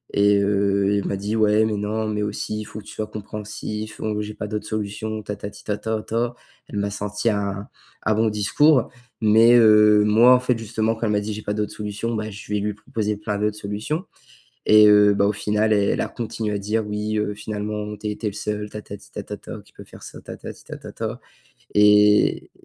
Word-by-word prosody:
et 100 0 +4
heu, 100 0 +2
elle - - -5
m'a 100 - -1
dit: 105 +3 -3
«Ouais, 110 0 +4
mais 110 - -1
non, 110 +2 -2
mais 105 -1 -2
aussi, 105 +1 -3
il 105 - -6
faut 110 - -10
que - - -11
tu - - -10
sois 110 - -4
compréhensif, 105 0 -6
donc 105 -1 -1
j'ai 105 0 -5
pas - - -5
d'autres 105 0 -4
solutions, 110 0 -4
tatati 100 0 -7
tatata». 110 +3 -2 0.3
Elle 105 - -6
m'a 100 0 -1
sorti 105 +2 -2
un 100 -1 -2 0.4
un 110 - +2
bon 110 0 +2
discours. 125 +7 +3 0.3
Mais, 110 +2 +6
heu, 105 -2 +6
moi, 115 +4 +6
en 125 - +3
fait, 125 -1 0
justement, 110 0 -1
quand 115 - -3
elle 105 - +1
m'a 105 - +2
dit: 105 +1 -4
«J'ai 105 - -6
pas 105 - -2
d'autres 105 -1 -2
solutions», 105 +2 -4
bah, 110 0 -3
je 105 +1 -10
vais 105 - +1
lui 105 +1 -2
proposer 105 0 -3
plein 105 -1 -3
d'autres 105 0 -1
solutions 105 - -4 0.6
et 105 0 +8
heu, 105 0 +6
bah, 100 0 +2
au 105 - +2
final, 105 +1 +1
elle 100 -1 +2
a - - -1
continué 110 -2 -4
à - - -2
dire: 105 +2 -1
«Oui, 105 +1 -2
heu, 105 -1 -1
finalement, 105 0 -4
tu 105 - -6
as - - 0
été 105 +1 -4
le 100 - -3
seul, 105 0 -4
tatati 105 -1 -10
tatata, - - -7
qui - - -24
peut - - -11
faire - - -14
ça, - - -10
tatati - - -9
tatata» - - -6 0.6
et 105 0 +5
105 Hz, 210 wpm, -22 LUFS, 105-110 Hz, 0.6 s, et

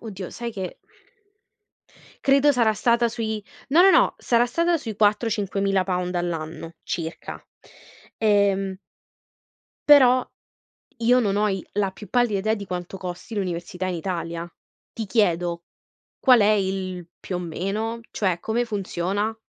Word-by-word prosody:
oddio, 195 -5 -7
sai 235 -1 -5
che 190 -3 -6 1.5
credo 280 +1 +5
sarà 235 -5 +2
stata 235 +3 +2
sui 220 -2 -3 0.3
no, 315 +6 +6
no, 385 - +7
no, - - +4
sarà 235 0 +2
stata 335 +7 +1
sui 225 -8 -6
4, 210 +2 +2
£5000 195 -3 -1
all'anno, 165 -1 -4
circa. 165 0 -5 0.7
Ehm 200 -3 +2 1.1
però, 255 -3 +7 0.7
io 240 +2 +4
non 205 -5 +1
ho 210 +1 +2
i 190 -2 -3
la 200 -1 0
più 205 +2 -12
pallida 240 -5 +2
idea, 215 +3 +1
di 205 -2 -7
quanto 180 0 -5
costi 185 +4 -7
l'università 180 -2 -3
in 185 - -2
Italia. 170 -1 -4 0.4
Ti 225 - -5
chiedo, 175 -5 +1 0.6
qual 250 -3 +6
è 205 0 +5
il 190 -3 -1
più 185 - -5
o - - -2
meno? 200 +7 -3
Cioè, 185 -4 0
come 230 +5 0
funziona? 205 0 -2
200 Hz, 135 wpm, -24 LUFS, 180-230 Hz, 1.5 s, no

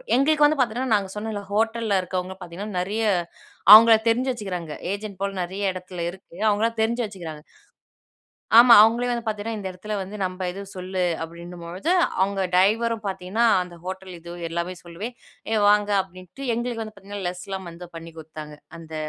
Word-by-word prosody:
எங்களுக்கு 295 +3 +4
வந்து 300 0 +3
பாத்தீங்கன்னா 245 0 +1
நாங்க 195 -2 -1
சொன்னேல 210 -1 -4
ஹோட்டல்ல 225 -1 +1
இருக்கறவங்க 185 +1 -4
பார்த்தீங்கன்னா, 185 +3 -6
நறைய 210 +5 -2 0.7
அவங்கள 225 +1 +10
தெரிஞ்சு 250 +3 +2
வச்சுக்கிறாங்க. 180 -9 -5 0.2
ஏஜென்ட் 200 -1 -5
போல 200 0 0
நறைய 190 +2 -2
இடத்துல 180 -1 -7
இருக்கு. 185 -1 -13
அவங்களா 210 +2 +2
தெரிஞ்சு 235 +2 +1
வச்சுக்கிறாங்க. 170 -7 -8 1.2
ஆமா, 240 0 +9
அவங்களே 235 +3 +3
வந்து 235 -1 -2
பார்த்தீங்கன்னா, 220 +1 -3
இந்த 195 - -6
இடத்துல 210 +4 -6
வந்து 195 +3 -8
நம்ம 185 0 -3
எதுவும் 195 +2 -8
சொல்லு 185 0 -3 0.2
அப்டின்னும்பொழுது 170 - -6 0.3
அவங்க 195 0 +1
டிரைவரும் 220 +4 +2
பார்த்தீங்கன்னா, 190 +5 0 0.2
அந்த 180 -1 -10
ஹோட்டல் 190 0 -6
இது 170 +1 -10 0.2
எல்லாமே 170 +2 -3
சொல்லுவேன் 200 +9 -7 0.4
ஏய் 215 -2 +2
வாங்க 210 0 +3
அப்டின்ட்டு 185 +8 -10
எங்களுக்கு 235 -1 -3
வந்து 215 0 -8
பார்த்தீங்கன்னா, 200 -1 -7
லெஸ்லாம் 190 0 -6
வந்து 175 +1 -10
பண்ணி 165 0 -9
குடுத்தாங்க. 155 -1 -9 0.2
அந்த 160 -1 -10
195 Hz, 155 wpm, -24 LUFS, 180-225 Hz, 1.2 s, அவங்கள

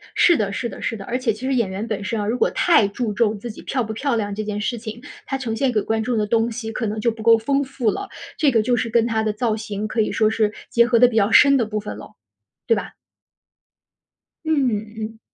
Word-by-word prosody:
是 345 -3 +5
的， 200 -2 -1
是 235 +3 -3
的， - - -10
是 230 - -2
的。 195 - -9
而 245 - -2
且 255 -4 0
其 220 +5 -8
实 270 - 0
演 230 -6 +1
员 200 +4 -4
本 205 -2 -3
身 220 +2 -2
啊， 205 - -2
如 235 +3 0
果 - - +2
太 275 - +4
注 215 +1 -3
重 215 0 +1
自 235 +3 -6
己 - - -12
漂 260 -3 -2
不 220 0 -5
漂 265 +3 -1
亮 205 -3 -2
这 215 +2 -3
件 210 -1 -3
事 240 +3 -2
情， 225 0 -8 0.2
她 270 - -2
呈 235 -4 -3
现 270 +2 +1
给 215 -3 +1
观 220 +2 -1
众 240 +1 -1
的 210 - +1
东 230 +2 +1
西 225 -1 -5
可 225 +1 -3
能 215 +1 -3
就 235 +2 +1
不 220 -1 -9
够 230 -1 +6
丰 275 +5 0
富 260 -4 -1
了。 395 - -5 0.3
这 290 -3 +3
个 225 -3 +3
就 245 +3 +1
是 230 0 -1
跟 230 0 +3
她 220 -1 0
的 215 - 0
造 220 0 0
型 210 -1 -4
可 220 +1 0
以 215 - 0
说 215 -1 +2
是 215 -1 0 0.2
结 235 0 +4
合 240 -1 +3
得 245 - +7
比 240 - -4
较 215 0 +3
深 280 +2 +7
的 235 - +1
部 215 0 -3
分 210 - -7
了， - - -12 0.5
对 460 - +4
吧？ - - -5 1.5
嗯 290 -5 +2 0.3
嗯。 220 0 -6
225 Hz, 290 characters per minute, -21 LUFS, 215-245 Hz, 1.5 s, 得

